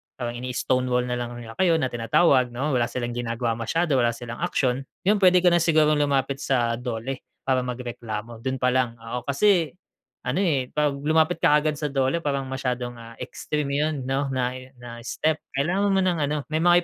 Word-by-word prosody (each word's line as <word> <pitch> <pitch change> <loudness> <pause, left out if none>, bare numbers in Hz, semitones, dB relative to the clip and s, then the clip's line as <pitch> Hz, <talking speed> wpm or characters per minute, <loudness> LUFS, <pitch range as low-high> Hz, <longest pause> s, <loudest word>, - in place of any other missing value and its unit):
parang 120 -1 -4
ini-stone 125 0 0
wall 125 0 +1
na 125 0 -2
lang 120 0 -4
nila 115 -2 -8
kayo 175 -3 +4
na 130 -6 0
tinatawag 125 +3 +3
‘no, 130 +5 -2
wala 120 -2 +2
silang 120 -1 -3
ginagawa 115 -1 -2
masyado, 145 +3 +1
wala 120 -1 +2
silang 120 -1 -7
aksiyon, 135 -6 0 0.2
yun 205 +2 +3
puwede 185 -1 +5
ka 180 - +6
na 175 - +4
sigurong 155 -2 +3
lumapit 140 -1 +1
sa 120 -4 0
DOLE 125 +2 -4 0.2
para 130 -1 +2
magreklamo, 120 -3 -5
dun 130 +3 -2
pa 125 -1 +1
lang, 125 -2 +1
oo. 115 +2 -5
Kasi 170 +2 +3 0.5
ano, 195 - +1
eh, 140 -8 +1
‘pag 150 -1 +2
lumapit 160 +3 +2
ka 150 - +5
kaagad 150 0 +1
sa 150 - -1
DOLE, 135 +3 +1
parang 140 -3 -1
masyadong, 125 -2 -3
ah, 115 0 -11
extreme 140 +3 -4
yun 155 +1 +1
‘no, 135 +2 -1
na 130 -2 -1
i 130 - -11
na 120 -1 -10
step. 155 +4 0 0.2
Kailangan 180 +9 +1
mo 190 - +3
ng 180 -2 +1
ano, 150 +1 0
may 155 - +1
mga 175 +1 +5
130 Hz, 200 wpm, -25 LUFS, 120-155 Hz, 0.5 s, ka